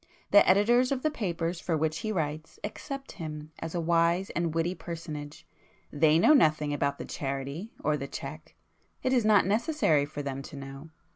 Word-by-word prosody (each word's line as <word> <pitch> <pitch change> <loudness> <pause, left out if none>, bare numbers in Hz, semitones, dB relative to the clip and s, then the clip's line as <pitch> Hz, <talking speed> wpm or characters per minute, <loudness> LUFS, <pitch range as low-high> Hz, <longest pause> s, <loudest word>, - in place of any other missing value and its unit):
The 205 - +7
editors 240 +7 +4
of 265 -2 -1
the 310 - +2
papers 175 - -2
for 170 -2 -1
which 155 +1 -1
he 215 - -3
writes 155 -4 -3
accept 275 +6 -6
him 155 -1 -7
as 165 +1 -5
a - - 0
wise 170 +2 +2
and 170 -1 -1
witty 165 +2 0
personage; 155 -5 -7 0.5
they 155 +1 +4
know 240 - +6
nothing 155 - +3
about 140 -1 0
the - - -6
charity 140 - -4
or 150 - +2
the 140 0 -5
cheque,—it 155 - -7
is 245 -4 +3
not 210 -4 +5
necessary 205 - +2
for 145 0 -6
them 135 -1 -4
to 140 - -10
know. 135 +2 -9
165 Hz, 175 wpm, -29 LUFS, 150-200 Hz, 0.5 s, The